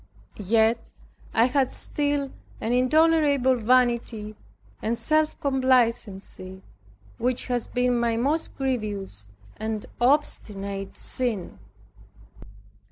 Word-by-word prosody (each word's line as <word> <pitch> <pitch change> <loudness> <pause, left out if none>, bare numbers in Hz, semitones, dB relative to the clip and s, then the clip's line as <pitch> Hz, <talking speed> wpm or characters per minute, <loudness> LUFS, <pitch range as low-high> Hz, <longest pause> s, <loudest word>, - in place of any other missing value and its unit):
Yet 220 +3 +2 0.5
I 225 - +4
had 265 0 +1
still 285 -2 -2 0.3
an 230 - -1
intolerable 285 0 +4
vanity 235 -3 +1 0.5
and 230 +2 -1
self 310 +6 +1
complacency, 230 -8 0 0.6
which 250 +1 0
has 245 -2 -1
been 245 -1 +1
my 235 -1 +1
most 290 +7 -1
grievous 210 - -3 0.3
and 220 -1 -3 0.2
obstinate 200 -7 0
sin. 235 -8 -2
245 Hz, 90 wpm, -25 LUFS, 215-265 Hz, 0.6 s, I